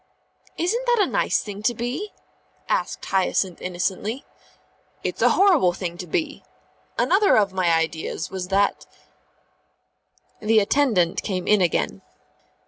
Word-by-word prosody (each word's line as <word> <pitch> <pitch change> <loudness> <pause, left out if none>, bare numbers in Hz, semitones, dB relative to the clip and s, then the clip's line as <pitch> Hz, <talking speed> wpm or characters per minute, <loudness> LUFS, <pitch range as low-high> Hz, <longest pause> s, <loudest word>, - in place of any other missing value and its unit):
"Isn't 460 +9 -1
that 480 0 +3
a 400 - +5
nice - - 0
thing 205 -1 -7
to 240 +3 +1
be?" 255 - -4 0.6
asked - - -2
Hyacinth 190 -1 0
innocently. 190 +7 -3 0.8
"It's - - -3
a - - +5
horrible 345 - +4
thing 175 -1 -5
to 180 - -6
be. 295 - -3 0.5
Another 395 +3 +4
of 200 -3 +2
my 185 -2 +1
ideas 165 0 -1
was 185 -1 -4
that 200 +1 +1 0.8
" - - -42
The 220 +1 +2
attendant 205 -6 +2
came 185 -3 -3
in 210 -2 +4
again. 115 - 0
200 Hz, 135 wpm, -23 LUFS, 180-285 Hz, 0.8 s, a